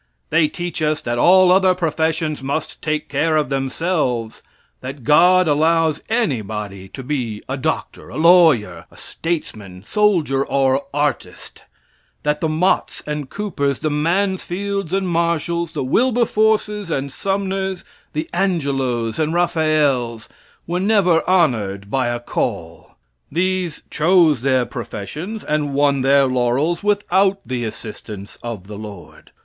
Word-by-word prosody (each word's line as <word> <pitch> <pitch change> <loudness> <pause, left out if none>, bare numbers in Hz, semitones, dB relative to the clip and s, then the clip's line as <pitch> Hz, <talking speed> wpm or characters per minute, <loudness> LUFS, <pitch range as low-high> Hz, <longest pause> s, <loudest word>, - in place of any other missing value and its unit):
They 160 0 +4
teach 175 +1 -5
us 155 0 +1
that 120 0 -2
all 185 +3 +6
other 185 0 +4
professions 160 -2 -1
must 140 +3 -4
take 155 -1 -2
care 155 +3 +1
of 150 -3 0
themselves; 135 -4 -1 0.4
that 130 0 -8
God 180 +6 +5
allows 160 +1 +2
anybody 105 - -2
to 130 +7 -9
be 125 -6 -3
a 135 - -2
doctor, 150 +4 -3
a - - -7
lawyer, 155 - +4
statesman, 105 - -5
soldier, 165 - +2
or 135 0 +1
artist; 145 0 -3 0.6
that 150 0 0
the 160 - +1
Motts 160 +4 0
and 150 -3 -4
Coopers 145 -10 -2
the 155 - -2
Mansfields 190 +3 -1
and 190 0 0
Marshalls 170 0 -1
the - - -2
Wilberforces 215 - +1
and 140 -3 -2
Sumners 195 0 -2 0.3
the 155 +1 -3
Angelos 135 - -1
and 155 +1 0
Raphaels 155 -9 +1 0.4
were 175 +2 -2
never 190 -5 +3
honored 105 - +1
by 130 -2 +1
a 120 0 -2
"call." 120 - -4 0.4
These 180 0 -1
chose 160 -4 +3
their 130 -1 +2
professions 150 - -6
and 150 -2 -1
won 140 -1 +2
their 135 +1 +4
laurels 130 +7 0
without 200 -1 +2
the 125 -2 -3
assistance 105 -2 -8
of 115 -6 -6
the 105 0 -9
Lord. 105 -4 -11
155 Hz, 130 wpm, -20 LUFS, 130-180 Hz, 0.6 s, all